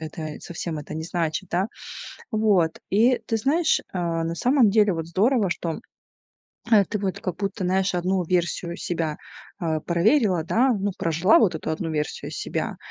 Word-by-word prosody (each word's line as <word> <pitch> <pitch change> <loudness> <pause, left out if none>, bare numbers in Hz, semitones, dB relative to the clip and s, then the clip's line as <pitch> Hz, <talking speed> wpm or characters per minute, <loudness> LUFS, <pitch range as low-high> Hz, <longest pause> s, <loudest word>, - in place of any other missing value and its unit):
это 155 -1 -6
совсем 165 -1 -5
это 150 +1 -8
не 160 +1 -4
значит, 170 +1 -2
да. 190 +5 0 0.6
Вот. 205 -7 +2
И 235 +6 +4
ты 225 - -1
знаешь, 315 +8 +2
а, 170 -3 -1
на 165 +1 -2
самом 250 +3 +4
деле, 210 -2 +4
вот 165 -1 -4
здорово, 205 +3 +2
что, 170 -2 -3 0.9
э, 205 -3 +6
ты 210 - -3
вот 195 -2 -2
как 185 - -3
будто, 200 0 -3
знаешь, 190 +1 +1
одну 180 +1 0
версию 175 0 -1
себя, 165 -3 -2 0.4
а, 160 -4 -1
проверила, 180 - +2
да, 250 +8 +3
ну, 205 -1 -1
прожила 165 +5 +3
вот 205 -7 +3
эту 160 - -5
одну 160 +1 -3
версию 150 -1 -3
себя - - -3
180 Hz, 165 wpm, -24 LUFS, 165-210 Hz, 0.9 s, э